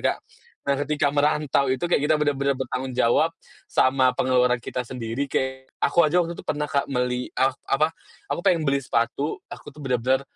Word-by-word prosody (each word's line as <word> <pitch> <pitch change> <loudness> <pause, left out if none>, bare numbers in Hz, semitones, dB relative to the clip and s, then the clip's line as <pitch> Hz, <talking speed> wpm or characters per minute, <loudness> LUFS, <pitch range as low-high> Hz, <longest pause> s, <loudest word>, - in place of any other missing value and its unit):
Kak. - - -17 0.5
Nah, 140 - +2
ketika 145 -1 0
merantau 145 -2 +2
itu, 130 +7 0
kita 175 - -1 0.2
kayak 155 - +4
benar-benar 140 -2 +1
bertanggung 130 0 -3
jawab 120 -2 +3 0.4
sama 130 0 +3
pengeluaran 125 -1 +3
kita 125 +1 -3
sendiri, 125 +2 -4
kayak, 130 0 -2
aku 170 - +3
aja 155 +3 +3
waktu 170 0 -3
itu - - -7
pernah 150 0 -1
Kak, 140 -2 -1
meli 125 -1 -1
ak 135 +1 +3 0.2
apa, 155 +4 +2 0.4
aku - - -2
pengen 165 -3 +2
beli 140 -1 +1
sepatu, 125 +4 -1
aku - - -9
tuh 150 - -22
benar-benar, 130 0 +1
135 Hz, 180 wpm, -24 LUFS, 125-145 Hz, 0.5 s, kayak